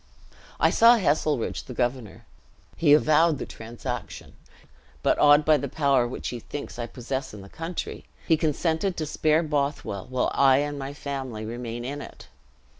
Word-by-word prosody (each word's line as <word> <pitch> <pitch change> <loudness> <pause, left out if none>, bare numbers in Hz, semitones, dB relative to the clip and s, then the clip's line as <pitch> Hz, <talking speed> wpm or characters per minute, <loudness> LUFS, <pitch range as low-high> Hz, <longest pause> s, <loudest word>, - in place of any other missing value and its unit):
"I - - +4
saw 235 +1 +6
Heselrigge 150 - 0
the 125 -4 -9
governor. 120 -5 -3 0.5
He 155 -3 +3
avowed 155 +1 +4
the - - -5
transaction; 120 +2 -7 0.7
but - - +2
awed 145 0 +6
by 155 -1 +5
the 140 - -4
power 140 -5 +2
which 120 - -5
he 120 - -5
thinks 140 +1 -8
I 120 - -3
possess 130 +1 -5
in 100 - -10
the 100 - -12
country, 165 - -6 0.2
he 165 - +5
consented 160 +4 -1
to 155 - -2
spare 155 +2 +1
Bothwell 140 - -2
while 130 -1 0
I 135 -1 +5
and 145 0 -2
my 135 +1 -6
family 135 -7 -5
remain 120 +1 -5
in 145 +3 -5
it. - - -12
140 Hz, 165 wpm, -25 LUFS, 120-155 Hz, 0.7 s, saw